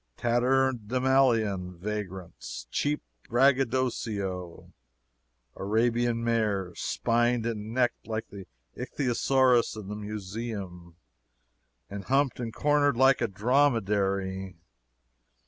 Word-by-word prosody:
Tatterdemalion 120 -5 +2
vagrants 95 -2 -6
cheap 150 +1 -1 0.3
braggadocio 115 -8 0 0.8
"Arabian 115 +3 +1
mares" 105 -6 0
spined 120 0 +1
and 110 -2 -3
necked 125 -1 0
like 110 0 -4
the 100 -2 -10 0.3
ichthyosaurus 125 -1 +2
in 100 -2 -9
the 105 - -4
museum, 105 -4 -6 0.9
and 100 -1 -7
humped 135 0 +1
and 115 -2 -3
cornered 145 0 +2
like 130 0 +5
a 120 - +2
dromedary! 100 -5 +1
115 Hz, 85 wpm, -28 LUFS, 100-125 Hz, 0.9 s, like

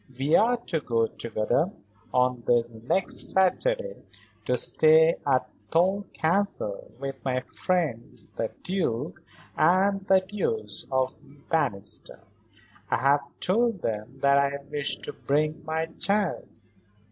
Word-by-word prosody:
We 140 +4 +2
are 240 +3 +4
to 185 -8 -3
go 115 -5 +1
together, 115 - -1 0.4
on 125 -1 +2
this 120 -1 +2
next 120 +12 -1
Saturday, - - +1 0.5
to - - +1
stay 160 +1 +5
at 130 -2 +2 0.2
Thole 190 +4 +2
Castle 160 - 0
with 135 -1 -6
my 130 -1 0
friends 155 -6 -2
the 115 - -1
Duke 170 -3 -2 0.3
and 190 +4 +3
Duchess 185 - +1
of 130 0 0 0.3
Bannister. 100 -12 -1 0.7
I - - +2
have 140 +3 +3 0.2
told 225 0 +1
them 110 +4 -3
that 140 0 +5
I 140 0 0
wish 145 -1 -1
to - - -6
bring 150 +2 -1
my 160 +1 -1
child." 200 +3 -1
155 Hz, 120 wpm, -27 LUFS, 125-185 Hz, 0.7 s, stay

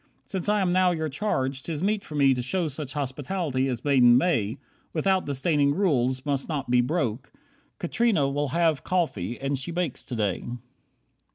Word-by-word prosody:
Since 190 +1 -3
I 210 -1 +3
am 185 -2 +1
now 185 0 +4
your 160 -3 -1
charge, 135 -5 -1
'tis 160 +2 -4
meet 205 0 +1
for 150 - -9
me 140 -2 +5
To 125 - -2
show 170 +7 -1
such 145 -2 -5
hospitality 145 0 -2
as 125 0 -4
maiden 125 -4 +6
may, 125 - +1 0.4
Without 190 +2 +1
disdaining 140 0 +1
rules 130 -9 +1
must 140 0 -1
not 140 -5 -3
be 125 0 +5
broke. 130 -3 -2 0.5
Katrina 200 - +1
will 145 +1 -1
have 165 0 +1
coffee, 120 - -1
and 140 0 -1
she 140 - -5
bakes 170 -5 -2
today." 105 -6 -2
145 Hz, 170 wpm, -26 LUFS, 130-175 Hz, 0.5 s, maiden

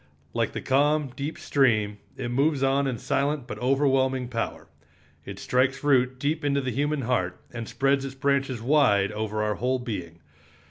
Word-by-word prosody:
Like - - 0
the - - -4
calm, 145 +1 +2
deep 145 +3 -4
stream, 110 -7 +1 0.2
it 120 - -4
moves 140 +2 +1
on 135 +1 +2
in 125 -3 -2
silent 140 +3 -1
but 105 - -7
overwhelming 130 -1 +2
power. 115 -2 -4 0.6
It - - -7
strikes 130 +2 0
root 130 -3 +3
deep 150 +4 -1
into 140 -1 +1
the 130 -2 -2
human 145 +4 0
heart, 95 -8 -1
and 120 -2 -6
spreads 135 0 +1
its 135 -1 -6
branches 135 -4 0
wide 120 -8 +3
over 105 0 -2
our 105 0 0
whole 125 +6 0
being. 95 -10 -6
130 Hz, 170 wpm, -26 LUFS, 120-140 Hz, 0.6 s, root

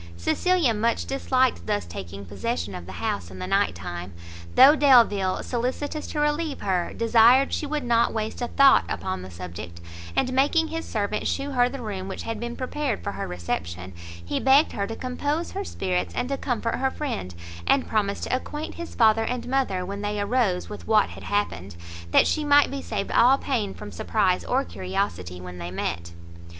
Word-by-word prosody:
Cecilia 330 - +2
much 230 +2 0
disliked 260 - 0
thus 100 -3 0
taking 95 +3 -8
possession 95 0 -3
of 90 -1 -8
the 95 - -8
house 85 +1 -3
in 95 - -10
the 90 - -4
night 90 - +1
time, 90 +1 -7 0.4
though 285 +3 +9
Delvile, 230 -10 +4
solicitous 260 +5 -3
to 300 - -4
relieve 295 0 0
her, 180 -3 0
desired 235 +4 +5
she 300 - -1
would 300 -1 -2
not 235 -1 +3
waste 220 +2 -3
a 240 - 0
thought 275 +2 +6
upon 95 0 -3
the 95 - -9
subject, 85 -1 -8 0.4
and 255 - +1
making 300 +5 +3
his 325 0 -4
servant 210 -1 -1
shew 280 +1 -2
her 245 -2 +3
the 265 -1 -7
room 195 -3 -4
which 195 - -5
had 225 -1 -4
been 235 +1 -4
prepared 260 -2 -3
for 200 - -2
her - - -5
reception, 90 +1 -4 0.3
he - - -1
begged 275 +4 +5
her 200 0 -2
to 225 - -5
compose 290 +7 -2
her 395 - -3
spirits, 185 - -2
and 250 - -1
to 275 - 0
comfort 235 -4 -2
her 265 0 +1
friend, 240 - -4 0.3
and 275 - +3
promised 200 -2 -1
to - - 0
acquaint 295 +4 -5
his 340 0 -8
father 225 -1 +4
and 245 +1 -3
mother 250 -9 0
when 200 +2 -5
they 205 0 -2
arose 205 -4 +1
with 210 - -9
what 215 -1 +4
had - - -10
happened, 100 - -2 0.3
that - - +5
she 310 - 0
might 290 -1 +5
be 275 0 -4
saved 195 - -3
all 255 +3 +5
pain 230 -8 -1
from 210 - -9
surprise 195 -5 +1
or 265 +2 +1
curiosity 90 -1 -3
when 90 0 -9
they 85 0 -5
met. 85 -1 -4
220 Hz, 190 wpm, -25 LUFS, -, 0.4 s, though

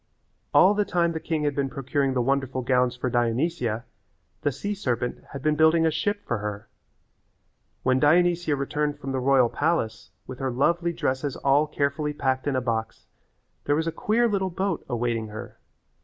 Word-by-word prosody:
All 195 - +6
the 210 0 +1
time 170 -3 +1
the 160 - -3
king 160 -1 -2
had 145 -1 +1
been 140 -1 -1
procuring 135 0 -1
the 125 - +2
wonderful 130 -1 0
gowns 125 -1 +2
for 125 +1 -3
Dionysia 120 0 0 0.6
the 145 - +1
sea 205 +9 -3
serpent 125 - -2
had 140 -2 -7
been 155 0 +2
building 160 +1 +4
a 160 - +3
ship 205 +7 -2
for 120 - -1
her. 105 +1 -5 1.2
When 130 0 +3
Dionysia 170 +1 +3
returned 145 +2 -2
from 135 - -5
the 135 - -1
royal 130 -1 +4
palace 120 -6 -1 0.2
with 130 -1 -8
her 135 - -1
lovely 170 +7 +1
dresses 135 -3 -2
all 140 +2 +2
carefully 150 +1 -1
packed 130 -1 -1
in 140 - +1
a 130 - +1
box 115 -2 -3 0.6
there 145 - +2
was 160 +1 0
a 165 - -1
queer 230 +7 +1
little 195 -3 0
boat 190 0 -2
awaiting 120 -2 -1
her. 110 +1 -9
140 Hz, 180 wpm, -25 LUFS, 125-165 Hz, 1.2 s, All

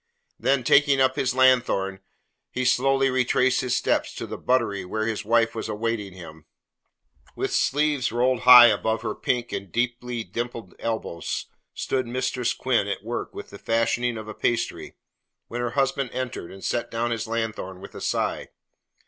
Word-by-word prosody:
Then, 135 -2 +1
taking 140 +2 +4
up 130 0 +3
his 130 -3 0
lanthorn, 120 -7 +3 0.5
he 130 - -3
slowly 135 +2 +3
retraced 130 0 +2
his 125 -2 0
steps - - 0
to - - -5
the - - -6
buttery 115 -6 0
where 110 +4 -3
his 110 -1 -2
wife 115 +1 +2
was 110 -1 -5
awaiting 110 -2 -3
him. 80 -4 -12 0.9
With - - -2
sleeves 145 -3 +1
rolled 125 +1 +1
high 125 -1 +10
above 110 +1 -1
her - - -2
pink 120 -1 -2
and 100 -3 -5
deeply 120 +1 -2
dimpled 115 0 -6
elbows 110 -7 -3 0.3
stood 130 -2 -1
Mistress 125 0 -1
Quinn 120 -6 +1
at 100 0 -4
work 120 +2 -4
upon - - -7
the - - -10
fashioning 115 +1 0
of 110 -1 -8
a 110 - -6
pastry, 120 +1 -2 0.5
when 120 +1 -4
her 120 - -1
husband 135 -1 +1
entered 125 -9 -4
and 95 0 -10
set 120 - -1
down 115 +1 -2
his 115 -1 -2
lanthorn 110 -4 -3
with 100 - -11
a - - -9
sigh. - - -1
120 Hz, 165 wpm, -25 LUFS, 110-130 Hz, 0.9 s, high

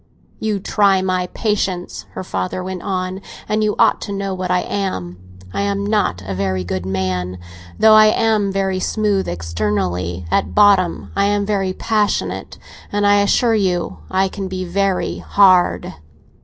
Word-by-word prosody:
"You 215 -2 -1
try 195 -1 +2
my 185 -1 0
patience," 195 -4 -2
her - - -5
father 95 - -3
went 185 -1 -5
on, 185 -1 -3 0.3
"and 215 0 0
you 210 -1 +1
ought - - +3
to - - -5
know 195 -1 -3
what 185 -1 -4
I 180 0 +2
am, 95 - -4 0.3
I - - -1
am 200 0 -1
not 205 - 0
a 95 - -4
very 95 -1 -1
good 90 +1 -4
man. 90 -1 -2 0.4
Though 220 0 +6
I 215 0 +8
am 215 -2 +2
very 190 -1 -1
smooth 205 -1 0
externally, 90 0 -2
at - - 0
bottom 200 -4 +3
I 200 - +2
am 205 0 +1
very 195 -2 -1
passionate; 210 0 -1 0.3
and 205 0 0
I 205 0 +5
assure 230 +3 +2
you 180 - 0
I 190 +1 +2
can 195 0 -5
be 185 0 -4
very 195 +1 -1
hard." 185 -3 +3
190 Hz, 160 wpm, -19 LUFS, 160-205 Hz, 0.4 s, I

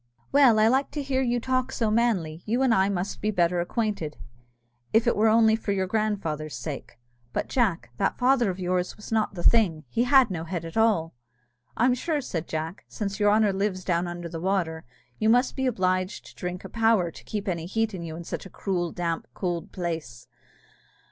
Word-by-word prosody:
"Well, 270 -5 +6
I 215 0 +5
like 265 +4 +2
to 295 - -2
hear 265 -1 0
you 245 -1 +1
talk 255 +1 0
so 225 -3 0
manly; 195 -9 +1
you 240 +5 +1
and 255 -3 +4
I 195 -2 +3
must 190 0 -3
be 215 - 0
better 175 -3 +2
acquainted, 200 -5 -2 0.8
if 225 +1 +4
it 240 - +2
were 215 +2 +3
only 220 0 +5
for 220 -2 -2
your 190 -1 0
grandfather's 185 -7 -2
sake. 140 -5 -6 0.4
But, - - -2
Jack, 195 - 0
that - - 0
father 245 -3 +3
of 185 - -3
yours 180 0 -1
was 210 - -11
not 220 -2 +1
the 175 - -5
thing! 180 -10 +3
he 235 - +1
had 265 -4 +5
no 165 -3 -3
head 170 -1 -4
at 165 - -8
all." 210 -8 +2 0.6
"I'm 245 +2 +4
sure," 300 +5 -1
said 175 - -4
Jack, 160 +4 -4
"since 200 -1 -4
your 205 0 +4
honour 210 -1 +4
lives 190 -1 -1
down 175 -1 0
under 175 0 -5
the 165 -1 -6
water, 175 -4 -1 0.3
you 215 - +2
must 245 +3 +3
be 265 -1 0
obliged 185 -3 0
to - - -14
drink 180 0 -5
a - - -7
power 225 -7 +2
to - - -13
keep 210 -1 -4
any 170 -3 -2
heat 225 +2 0
in 185 - -5
you 165 -1 -6
in 170 - -7
such 180 - -6
a - - -16
cruel, 175 -3 -2
damp, 170 -2 -3
could 175 -3 -3
place. 160 -9 -5
195 Hz, 205 wpm, -26 LUFS, 170-225 Hz, 0.8 s, Well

